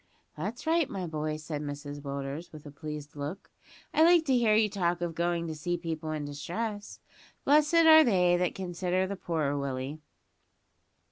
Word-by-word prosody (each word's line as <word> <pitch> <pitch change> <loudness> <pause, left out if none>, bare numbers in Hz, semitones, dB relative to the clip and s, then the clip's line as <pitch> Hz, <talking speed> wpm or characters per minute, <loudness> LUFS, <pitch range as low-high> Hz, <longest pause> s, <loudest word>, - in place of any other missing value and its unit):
"That's 205 - -5
right, 325 -2 +2
my 190 -3 -4
boy," 155 -1 -3
said 150 -1 -5
Mrs 145 0 -6
Willders, 140 +3 -5
with 155 -1 -12
a 145 - -9
pleased 150 0 -7
look; 145 +7 -6 0.4
"I - - +3
like 340 -1 +6
to 265 -3 +3
hear 230 -3 +4
you 215 0 +4
talk 175 -4 -1
of 175 -1 -3
going 170 0 -1
to 160 - -4
see 175 +3 -2
people 160 -2 -4
in 155 -1 -3
distress. 205 +9 -5 0.5
`Blessed 305 +3 +5
are 315 0 +9
they 180 -7 +3
that 180 0 0
consider 185 0 -1
the 200 +1 -4
poor,' 155 -6 -1
Willie." 140 +1 -3
170 Hz, 175 wpm, -29 LUFS, 150-205 Hz, 0.5 s, are